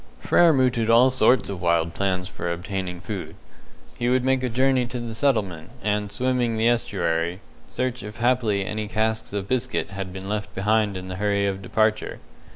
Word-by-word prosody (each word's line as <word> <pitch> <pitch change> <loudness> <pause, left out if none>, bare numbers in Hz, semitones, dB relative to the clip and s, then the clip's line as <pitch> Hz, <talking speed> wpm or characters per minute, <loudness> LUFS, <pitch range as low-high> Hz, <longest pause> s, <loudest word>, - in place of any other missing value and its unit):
Frere 170 - +5
mooted 125 -5 +2
all 120 +3 +6
sorts 130 -3 +3
of 95 -3 -5
wild 85 -1 +1
plans 95 -1 -1
for 85 -2 -4
obtaining 90 0 -4
food. 100 -3 -6 0.6
He 120 - +1
would 130 0 +2
make 130 0 +2
a 130 - -1
journey 130 +1 +2
to 125 0 -5
the 120 -1 -5
settlement, 100 - 0
and, 105 0 -1
swimming 125 0 0
the 110 +1 +2
estuary, 85 -6 0 0.3
search 130 0 -3
if 105 +2 -8
haply 115 -5 +1
any 105 +2 -3
casks 110 +1 -1
of 100 -1 -3
biscuit 130 -2 -1
had 95 -1 -5
been 95 +1 -7
left 105 0 -4
behind 105 0 +1
in 95 0 -7
the 95 0 -5
hurry 100 0 +1
of 95 -1 -2
departure. 110 +2 0
105 Hz, 180 wpm, -24 LUFS, 95-120 Hz, 0.6 s, all